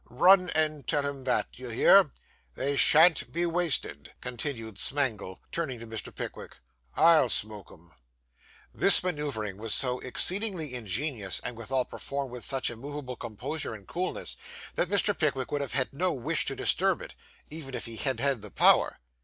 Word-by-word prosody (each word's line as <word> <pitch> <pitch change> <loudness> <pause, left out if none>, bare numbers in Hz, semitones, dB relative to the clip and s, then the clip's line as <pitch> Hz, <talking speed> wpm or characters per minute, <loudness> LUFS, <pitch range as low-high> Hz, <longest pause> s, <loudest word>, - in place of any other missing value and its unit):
Run 180 +8 +4
and 155 -2 -1
tell 145 -1 0
him 140 -2 -7
that; 125 - 0
d'ye 125 0 -9
hear? 185 +9 +5 0.5
They 140 +2 -2
shan't 160 +4 +5
be 170 +2 -1
wasted,' 165 - 0
continued 115 -4 -5
Smangle, 120 -9 0
turning 155 -7 -3
to 115 - -10
Mr. 110 -1 -6
Pickwick. - - -8 0.4
'I'll 160 -5 +5
smoke 105 -2 0
'em.' 85 0 -19 0.8
This 195 - +6
manoeuvring 145 - -3
was 110 0 +1
so 125 -1 +1
exceedingly 180 - +1
ingenious 110 - -2
and, 125 - -6
withal, 125 +3 -2
performed 140 -2 -5
with 125 -1 -6
such 135 -2 -1
immovable 130 +2 -7
composure 120 +5 -5
and 100 -2 -14
coolness, 180 +2 -2 0.4
that 175 - -1
Mr. 200 0 +3
Pickwick 140 -5 -1
would 145 - -1
have 140 - -4
had 130 -1 0
no 180 +6 0
wish 155 +5 0
to 135 - -2
disturb - - +1
it, - - -10 0.4
even 145 -4 -8
if - - -5
he 115 -1 -8
had 130 -2 -2
had 135 -3 0
the 105 - -8
power. - - +4
135 Hz, 165 wpm, -28 LUFS, 115-155 Hz, 0.8 s, This